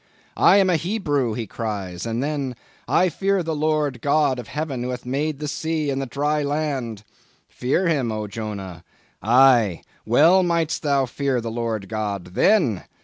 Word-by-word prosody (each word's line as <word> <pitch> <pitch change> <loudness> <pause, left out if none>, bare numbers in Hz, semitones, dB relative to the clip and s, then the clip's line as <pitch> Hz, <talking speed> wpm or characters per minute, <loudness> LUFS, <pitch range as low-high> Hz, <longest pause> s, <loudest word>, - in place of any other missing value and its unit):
"'I - - +6
am 195 -2 +4
a 170 - +3
Hebrew,' 145 - -1
he 115 - -3
cries—and 105 +2 -4
then—'I 145 +5 -1
fear 195 +2 0
the 160 -1 -2
Lord 150 -2 +1
the 120 - -14
God 140 -1 +2
of 120 - -8
Heaven 145 -4 -4
who 125 - -3
hath 125 -1 -5
made 145 +4 -1
the 150 +1 -5
sea 155 0 -2
and 135 0 -2
the 135 - -4
dry 150 +4 0
land!' 140 -7 -2 0.4
Fear 140 +9 0
him, 140 -8 +1
O 110 -1 -3
Jonah? 100 -5 -6 0.4
Aye, 120 -5 +4 0.2
well 160 +11 +5
mightest 170 -2 0
thou 140 -3 +2
fear 130 0 -1
the 115 -1 -4
Lord 115 -3 -3
God 100 -4 -4
_then! 160 - +2
135 Hz, 165 wpm, -22 LUFS, 115-155 Hz, 0.4 s, I